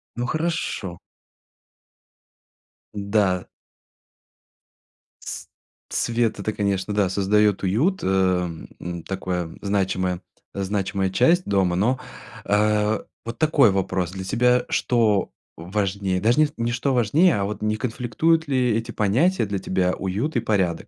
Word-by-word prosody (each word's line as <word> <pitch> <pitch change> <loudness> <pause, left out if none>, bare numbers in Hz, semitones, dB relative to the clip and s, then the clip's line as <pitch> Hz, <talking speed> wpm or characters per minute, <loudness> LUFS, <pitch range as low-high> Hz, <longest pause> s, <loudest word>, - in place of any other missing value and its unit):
Ну 120 - -2
хорошо. 155 - -2 2.0
Н-да. 100 -3 +1 1.7
С - - -7 0.4
свет 115 -2 0
это, 105 +2 -2
конечно, 100 0 -1
да, 100 -3 +2
создаёт 100 +1 +2
уют, 135 - +1
эм, 90 -3 0
м, 85 -1 -6
такое 90 -3 -3
значимая 95 -3 -1 0.3
значимая 95 -1 -1
часть 170 - +3
дома. 95 -3 +1
Но, 120 +7 +2 0.5
а, 105 +1 +1 0.2
вот 115 0 -5
такой 150 -8 +4
вопрос. 95 -2 -1
Для 95 0 -6
тебя 125 +5 +2
что 110 -5 +1 0.2
важнее? 95 +1 -2
Даже 120 +8 +3
не 155 - +5
не 115 0 -1
что 130 +2 0
важнее, 135 - +3
а 100 - 0
вот 105 +1 -5
не 110 0 0
конфликтуют 125 +8 0
ли 125 -2 +2
эти 115 +1 -4
понятия 120 - +2
для 100 -1 -3
тебя, 95 -1 0
уют 100 +11 -2
и - - +3
порядок? 95 -6 0
105 Hz, 125 wpm, -23 LUFS, 95-120 Hz, 2.0 s, не